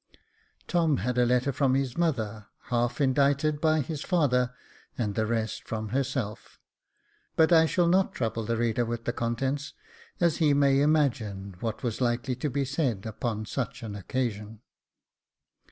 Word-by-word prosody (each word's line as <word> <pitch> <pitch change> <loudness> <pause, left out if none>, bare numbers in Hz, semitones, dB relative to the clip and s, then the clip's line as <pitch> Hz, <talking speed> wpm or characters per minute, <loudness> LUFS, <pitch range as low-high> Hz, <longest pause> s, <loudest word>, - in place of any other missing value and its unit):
Tom 165 -5 +2
had 125 +4 -1
a 120 - +4
letter 125 +3 +2
from 130 -1 +2
his 135 -2 -1
mother, 110 -11 -1 0.2
half 120 +2 0
indited 145 +2 +2
by 155 -1 +3
his 150 +1 -5
father, 125 -9 +2 0.5
and 105 -4 -1
the 110 +1 0
rest 110 -1 -2
from 110 -1 -3
herself; 130 -4 -3 0.8
but 160 +1 +4
I 160 -1 +6
shall 175 +1 +2
not 185 +2 +3
trouble 115 -2 -2
the 115 +1 -1
reader 120 +1 +1
with 115 0 -4
the 120 - -1
contents, 135 +5 -2 0.5
as 170 -3 +2
he 150 -4 +3
may 140 -1 +4
imagine 115 - 0
what 110 +2 -4
was 120 0 -2
likely 125 +1 0
to 145 +3 -2
be 140 +1 -1
said 130 - -1
upon 110 0 -3
such 125 +1 -4
an 110 -2 -5
occasion. 105 0 -3
125 Hz, 155 wpm, -28 LUFS, 115-145 Hz, 0.8 s, I